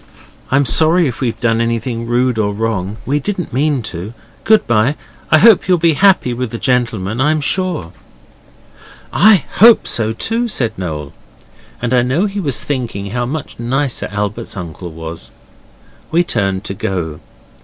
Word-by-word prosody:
'I'm 135 +1 +2
sorry 160 +7 +3
if 125 - -5
we've 115 -3 -2
done 115 -1 +1
anything 115 0 -2
rude 120 0 +1
or 100 -1 0
wrong. 105 -2 -2
We 145 +3 0
didn't 185 - -4
mean 140 -1 0
to. 95 +7 -7 0.3
Good 220 0 +4
bye. 120 +5 +2 0.3
I 155 - +6
hope 220 +1 +5
you'll 180 -1 +4
be 165 -1 +3
happy 185 -7 +3
with 125 0 -3
the 115 - -5
gentleman, 115 -4 -1
I'm 155 +3 +2
sure.' 175 - 0 1.2
'I 205 -6 +5
HOPE 230 +3 +6
so 110 -1 0
too,' 230 - -1
said 120 - -1
Noel, 75 -7 -5 0.7
and 120 +1 0
I 125 - +4
know 130 +10 +1
he 200 0 -3
was 145 -9 0
thinking 115 -8 -4
how 120 +1 -2
much 145 -1 -6
nicer 130 +3 -1
Albert's 105 +2 -4
uncle 90 0 -7
was. 80 +1 -8 0.8
We 170 +2 +3
turned 100 - -1
to 100 - -4
go. 85 -5 -4
120 Hz, 160 wpm, -16 LUFS, 105-155 Hz, 1.2 s, I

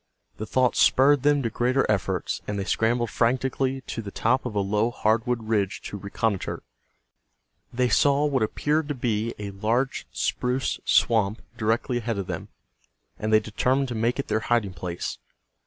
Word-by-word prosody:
The 110 - -5
thought 130 +2 +2
spurred 140 +1 +5
them 145 0 +3
to 115 - -1
greater 125 +4 +1
efforts, 100 -6 -1
and 105 - -2
they 100 - -1
scrambled 115 +3 0
frantically 130 +2 0
to 115 - -5
the 105 - -7
top 125 +6 0
of 110 - -7
a - - +2
low 105 +3 +1
hardwood 115 +1 0
ridge 105 -3 0
to 105 - -6
reconnoiter. 100 0 -2 1.1
They 125 +1 +1
saw 140 +3 +3
what 140 -3 +1
appeared 150 +7 0
to 145 - -2
be 115 -2 -1
a 100 -1 -5
large 115 +7 -1
spruce 125 +2 -1
swamp 110 -2 +2
directly 115 +2 0
ahead 115 -2 -3
of 100 - -2
them, 90 -3 -5 0.7
and 110 +1 -2
they 110 - +6
determined 125 +5 0
to - - -3
make 115 +2 0
it 140 - -3
their 110 +1 +1
hiding 110 -4 0
place. 90 -1 -5
115 Hz, 170 wpm, -25 LUFS, 105-130 Hz, 1.1 s, they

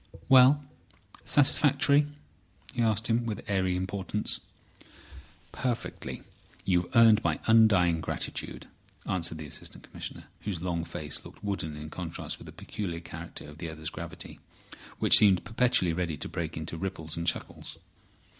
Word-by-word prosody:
"Well? 135 +3 +7 0.6
Satisfactory?" 145 0 +4 0.7
he 120 - -1
asked, 110 -1 +1
with 115 -2 -1
airy 95 -2 +1
importance. 95 +3 -2 1.1
"Perfectly. 125 -3 -4 0.4
You've 90 -2 +2
earned 115 -2 +7
my - - 0
undying 100 -7 +5
gratitude," - - -4 0.4
answered 85 -3 -1
the 80 - -7
Assistant 75 - -9
Commissioner, 85 - -8 0.2
whose 95 -3 -3
long 85 -1 -2
face 75 -3 -4
looked - - -14
wooden 95 -7 -3
in 75 +1 -8
contrast 85 -2 -4
with - - -12
the - - -9
peculiar 85 -5 -5
character 85 0 -9
of 75 +2 -12
the 85 -1 -4
other's 80 0 -5
gravity, 85 +1 -8 0.6
which - - +9
seemed 100 -4 +4
perpetually 115 -7 +2
ready 85 -3 -2
to - - -5
break 80 -2 -4
into 80 +1 -4
ripples 80 -3 -5
and 85 0 -4
chuckles. 80 - -3
90 Hz, 135 wpm, -29 LUFS, 80-110 Hz, 1.1 s, which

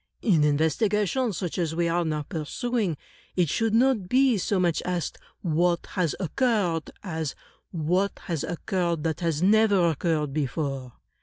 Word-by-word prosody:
In 175 -9 +4
investigations 200 - +1
such 180 -2 -3
as 160 -2 -1
we 170 0 +1
are 170 +1 +1
now 155 -2 -2
pursu 230 - -2
ing, 175 -8 -1 0.4
it 175 -4 +2
shoidd 225 +6 0
not 230 -5 +3
be 260 -1 +4
so 195 +1 0
much 175 -3 +1
asked 180 -2 -3 0.2
'what 170 0 +1
has 180 -5 0
occurred,* 190 - 0
as 160 -6 -3 0.3
*what 180 +5 0
has 165 -5 -2
occurred 175 -2 -1
that 160 -2 -1
has 165 -2 0
never 200 -4 +4
occurred 155 -2 -1
before. 135 -3 -2
175 Hz, 150 wpm, -26 LUFS, 160-200 Hz, 0.4 s, In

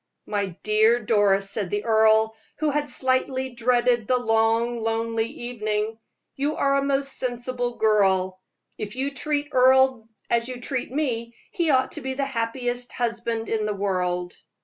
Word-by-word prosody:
"My 200 -4 -3
dear 220 +2 +4
Doris," 205 -3 +2
said 200 -3 -2
the 205 +2 -2
earl, 220 0 +4 0.2
who 305 -1 0
had 295 0 -1
slightly 260 0 0
dreaded 240 -1 +1
the 255 - +3
long, 225 0 +1
lonely 225 0 -1
evening, 220 -2 -3 0.4
"you 290 +3 -1
are 275 0 +2
a - - -1
most 275 0 -1
sensible 245 -1 -3
girl. 190 -4 +2 0.4
If 210 +1 -5
you 275 +2 -2
treat 290 +1 -2
Earle 260 -3 +4 0.2
as 235 0 +1
you 255 -1 -6
treat 250 0 -4
me, 235 -5 -2 0.2
he 340 -3 0
ought 260 -2 +3
to - - -6
be 265 0 -3
the 275 0 -1
happiest 245 0 -3
husband 230 -1 -2
in 215 -1 -1
the 210 - -2
world." 180 -3 -1
235 Hz, 155 wpm, -24 LUFS, 215-260 Hz, 0.4 s, dear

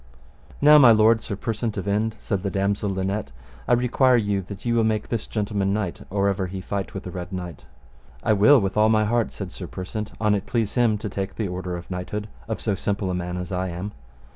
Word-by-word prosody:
Now 150 +1 +8
my 130 -4 +8
lord 110 +1 +5
Sir 100 - -4
Persant 110 +1 -3
of 95 - -4
Inde, 110 +2 0
said 100 -2 -2
the 100 - -2
damosel 100 +1 0
Linet, 95 +2 -2 0.4
I - - +4
require 125 +1 +4
you 100 -3 0
that 100 +1 -9
ye 120 - +1
will 115 -1 +3
make 110 -1 0
this 115 -3 -2
gentleman 100 -2 -1
knight 100 -5 -2
or 100 0 +1
ever 95 -1 0
he 95 +1 -6
fight 95 0 -4
with 95 - -5
the 90 - -6
Red 90 +1 -6
Knight. 90 -5 -7 0.6
I 110 - +3
will 120 +8 +6
with 95 -2 -2
all 105 +1 +4
my 110 -1 +3
heart, 115 0 +1
said - - -7
Sir - - -7
Persant, 105 +3 -5
an 105 -1 +3
it 100 -2 -2
please 115 -4 0
him 120 -4 +3
to 105 - -5
take 95 0 -4
the 110 - -2
order 90 0 -4
of 85 +2 -10
knighthood 105 +4 -4 0.2
of 110 - -3
so 105 - 0
simple 100 0 -1
a - - -1
man 90 0 -3
as 90 0 -5
I 90 0 -1
am. 90 +4 -5
100 Hz, 235 wpm, -24 LUFS, 95-110 Hz, 0.6 s, Now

